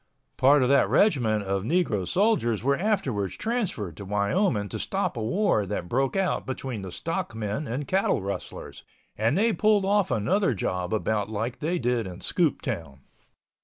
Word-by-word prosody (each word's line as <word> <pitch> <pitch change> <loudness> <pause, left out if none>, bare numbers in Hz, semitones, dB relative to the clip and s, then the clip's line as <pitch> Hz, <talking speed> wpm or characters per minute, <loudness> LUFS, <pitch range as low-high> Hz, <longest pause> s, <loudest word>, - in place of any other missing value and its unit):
Part 140 +1 +5
of 125 - +1
that 140 0 +4
regiment 120 - +3
of 95 0 -1
negro 110 - 0
soldiers 180 - +1
were 140 +2 +3
afterwards 140 - -1
transferred 200 - -2
to 100 - -7
Wyoming 105 - +1
to - - -5
stop - - -1
a 115 - -3
war 120 - +1
that 90 - -3
broke 135 +6 0
out 190 -2 0
between 130 -4 -4
the 95 -1 -7
stock 165 - -3
men 110 +7 -3
and 130 +4 -3
cattle 190 +1 +2
rustlers, 100 0 -6 0.3
and 115 - +1
they 225 +2 +3
pulled 210 -2 +3
off 200 -1 +2
another 125 - +1
job 90 -1 -2
about 110 -1 0
like 110 +3 -3
they 170 +4 -1
did 120 - 0
in 90 0 -8
Scooptown. 100 - -1
125 Hz, 165 wpm, -26 LUFS, -, 0.3 s, Part